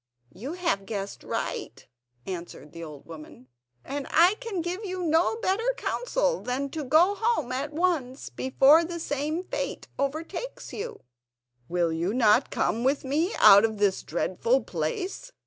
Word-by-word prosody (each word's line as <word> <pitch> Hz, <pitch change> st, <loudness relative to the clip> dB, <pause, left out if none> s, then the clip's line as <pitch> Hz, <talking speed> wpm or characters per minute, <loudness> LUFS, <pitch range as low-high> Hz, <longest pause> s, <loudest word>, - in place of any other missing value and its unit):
"You 250 Hz, -, -6 dB
have 335 Hz, -, -1 dB
guessed 200 Hz, -2 st, -5 dB
right," -, -, -4 dB, 0.4 s
answered 175 Hz, -5 st, -7 dB
the 170 Hz, -, -8 dB
old 150 Hz, -3 st, -10 dB
woman; 155 Hz, -6 st, -12 dB, 0.4 s
"and 280 Hz, 0 st, -4 dB
I 350 Hz, +4 st, +5 dB
can 450 Hz, -8 st, -3 dB
give 360 Hz, +5 st, -4 dB
you 370 Hz, -2 st, -4 dB
no 330 Hz, +5 st, +2 dB
better 455 Hz, +3 st, 0 dB
counsel -, -, -1 dB
than 265 Hz, +3 st, -2 dB
to 315 Hz, -, -4 dB
go 320 Hz, +8 st, +4 dB
home 440 Hz, -, 0 dB
at 275 Hz, +3 st, -2 dB
once, 300 Hz, -6 st, -1 dB
before 275 Hz, +5 st, +5 dB
the 340 Hz, 0 st, -5 dB
same 305 Hz, +3 st, -2 dB
fate -, -, -4 dB
overtakes 315 Hz, -, -4 dB
you." 455 Hz, +3 st, -6 dB, 0.7 s
"Will 170 Hz, -1 st, +1 dB
you 175 Hz, +7 st, -1 dB
not 235 Hz, +1 st, +4 dB
come 230 Hz, +2 st, 0 dB
with 275 Hz, +2 st, +1 dB
me 315 Hz, +9 st, 0 dB
out 200 Hz, +1 st, +8 dB
of 220 Hz, -1 st, 0 dB
this 200 Hz, -2 st, +1 dB
dreadful 225 Hz, -, 0 dB
place?" 360 Hz, -, -4 dB
280 Hz, 150 wpm, -27 LUFS, -, 0.7 s, out